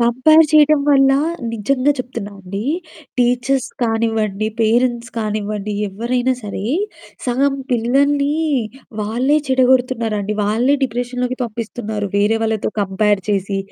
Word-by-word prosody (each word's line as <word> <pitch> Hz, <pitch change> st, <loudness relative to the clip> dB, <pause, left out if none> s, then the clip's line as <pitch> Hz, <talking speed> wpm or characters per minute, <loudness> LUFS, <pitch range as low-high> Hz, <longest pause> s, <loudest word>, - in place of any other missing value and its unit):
Compare 260 Hz, +7 st, +5 dB
చేయటం 305 Hz, -1 st, +5 dB
వల్ల 270 Hz, -1 st, +5 dB, 0.4 s
నిజంగా 255 Hz, +6 st, +1 dB
చెప్తున్నానండి. 200 Hz, -5 st, -6 dB, 0.5 s
టీచర్స్ 250 Hz, +2 st, +1 dB
కానివ్వండి, 225 Hz, -2 st, 0 dB
పేరెంట్స్ 235 Hz, +1 st, +1 dB
కానివ్వండి, 210 Hz, -1 st, -3 dB, 0.2 s
ఎవ్వరైనా 240 Hz, +5 st, -1 dB
సరే 200 Hz, -1 st, -5 dB, 0.6 s
సగం 270 Hz, +3 st, +1 dB, 0.2 s
పిల్లల్ని 280 Hz, +5 st, +2 dB, 0.7 s
వాళ్ళే 245 Hz, +8 st, +1 dB
చెడగొడుతున్నారండి. 245 Hz, -5 st, +1 dB
వాళ్ళే 230 Hz, +7 st, +2 dB
డిప్రెషన్‌లోకి 250 Hz, +1 st, -3 dB
పంపిస్తున్నారు. 215 Hz, -2 st, -4 dB
వేరే 205 Hz, +2 st, +3 dB
వాళ్ళతో 220 Hz, -2 st, -1 dB
కంపేర్ 200 Hz, +1 st, +1 dB
చేసి, 195 Hz, 0 st, -1 dB
235 Hz, 95 wpm, -18 LUFS, 210-255 Hz, 0.7 s, కంపేర్